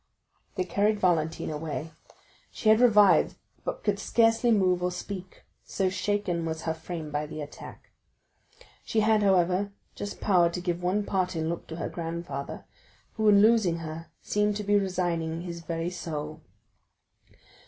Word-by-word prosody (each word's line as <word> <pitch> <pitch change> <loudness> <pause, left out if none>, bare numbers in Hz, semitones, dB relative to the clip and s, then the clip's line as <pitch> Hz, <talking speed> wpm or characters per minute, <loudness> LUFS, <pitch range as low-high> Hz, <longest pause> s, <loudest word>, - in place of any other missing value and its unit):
They 185 - 0
carried 205 +4 +1
Valentine 165 -4 +1
away; 155 +1 -4 0.6
she 220 - 0
had 220 +1 +6
revived, 210 -8 +5 0.3
but - - -4
could - - 0
scarcely 225 +1 +3
move 185 -5 +3
or 180 - +1
speak, 185 0 -7 0.2
so 190 -2 -1
shaken 185 -2 -1
was 160 0 -4
her 160 - -1
frame 160 -1 -7
by 150 +1 -2
the 155 - -7
attack. 145 -1 -10 0.9
She 220 - 0
had, 215 0 +3
however, 190 0 +2 0.2
just 205 - -6
power 180 -4 +4
to 170 - -4
give 175 -1 -2
one 185 +4 +1
parting 180 -5 -1
look 170 - -4
to 160 - -7
her 165 - -3
grandfather, 165 -4 -5 0.5
who 215 -1 +2
in 200 0 +6
losing 215 -7 +4
her 160 +1 -7 0.2
seemed 210 0 +1
to 210 - -3
be 205 0 +2
resigning 175 -4 0
his 170 -1 -6
very 165 +1 -3
soul. 155 -3 -5
180 Hz, 155 wpm, -27 LUFS, 165-205 Hz, 0.9 s, had